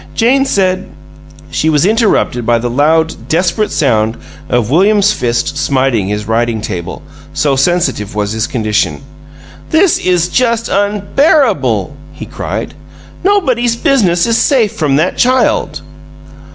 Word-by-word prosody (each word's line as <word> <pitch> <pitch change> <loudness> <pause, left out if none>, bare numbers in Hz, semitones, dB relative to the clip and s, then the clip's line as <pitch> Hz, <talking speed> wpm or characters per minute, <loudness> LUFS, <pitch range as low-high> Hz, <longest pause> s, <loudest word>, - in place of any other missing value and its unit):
"Jane 265 +4 +2
said 185 -6 0 0.3
" - - -21 0.3
She 160 - 0
was 150 +1 +2
interrupted 210 - +1
by 120 +1 +2
the 120 +1 -3
loud, 160 +5 0
desperate 180 +6 0
sound 110 -5 0 0.3
of 120 -1 0
William's 205 +5 +3
fist 120 - -2
smiting 130 -8 0
his 105 0 -4
writing 115 0 0
table, 90 -5 -6 0.3
so 140 -2 +1
sensitive 135 - 0
was 105 -1 -2
his 110 0 -2
condition. 105 - -1 0.7
"This 330 +3 +3
is 180 -2 +1
just 235 +2 0
unbearable!" 200 - +1 0.2
he - - -9
cried. - - -5 0.5
"Nobody's 255 - +1
business 200 -10 +1
is 230 0 +1
safe 235 -7 +2
from 145 -3 -1
that 155 +6 0
child!" 255 +1 +1
165 Hz, 130 wpm, -13 LUFS, -, 0.7 s, William's